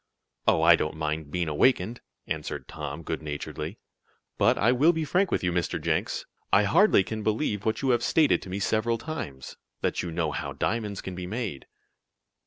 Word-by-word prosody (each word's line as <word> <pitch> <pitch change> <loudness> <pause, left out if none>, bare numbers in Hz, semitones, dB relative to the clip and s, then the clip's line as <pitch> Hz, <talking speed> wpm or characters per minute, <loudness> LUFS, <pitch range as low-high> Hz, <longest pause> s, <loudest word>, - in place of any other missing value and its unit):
"Oh, 80 - +4
I 85 +1 +8
don't 75 -1 -2
mind 75 -1 -3
being 90 +1 -1
awakened," 110 - +2 0.2
answered 75 -1 -4
Tom, 75 +1 -6
good 80 0 -3
naturedly, 75 -2 -5 0.6
"but - - +4
I 115 +4 +4
will 145 +7 +4
be 160 -1 -1
frank 185 +5 +2
with - - 0
you, 90 - +1
Mr. 85 -1 -1
Jenks. - - -1 0.3
I 100 - +6
hardly 165 - +5
can 110 +3 -5
believe 105 -1 -1
what 110 +4 0
you 135 - +3
have 120 -1 +2
stated 155 +4 +3
to - - -9
me 95 - -3
several 110 +3 +1
times 90 - -6 0.2
that - - 0
you 90 - -4
know 80 -2 -1
how - - -4
diamonds 105 -3 -2
can 95 - -6
be 90 0 -5
made." 105 - -4
95 Hz, 190 wpm, -27 LUFS, 80-120 Hz, 0.6 s, I